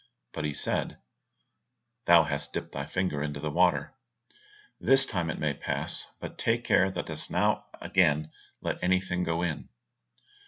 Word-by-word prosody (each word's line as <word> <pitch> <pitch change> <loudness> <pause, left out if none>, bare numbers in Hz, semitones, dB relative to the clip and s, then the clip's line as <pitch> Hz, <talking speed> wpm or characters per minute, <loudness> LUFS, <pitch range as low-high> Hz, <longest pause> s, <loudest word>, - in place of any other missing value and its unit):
But 75 - -3
he 75 - -1
said, - - -2 1.1
"Thou 85 -1 +8
hast 70 -2 -3
dipped - - -4
thy 70 0 -4
finger 85 -3 -1
into 75 -1 -3
the 75 +1 -3
water, 90 - +2 0.9
this 135 0 +4
time 90 -6 -2
it - - -3
may 75 -2 0
pass, 70 - -2
but - - -8
take 115 +1 +1
care 100 -5 +4
thou 90 -2 -3
dost 80 -1 -4
not - - +1
again 80 -4 +2 0.3
let - - -3
anything 90 0 +1
go 85 0 0
in." 85 -4 -3
85 Hz, 155 wpm, -29 LUFS, 75-95 Hz, 1.1 s, Thou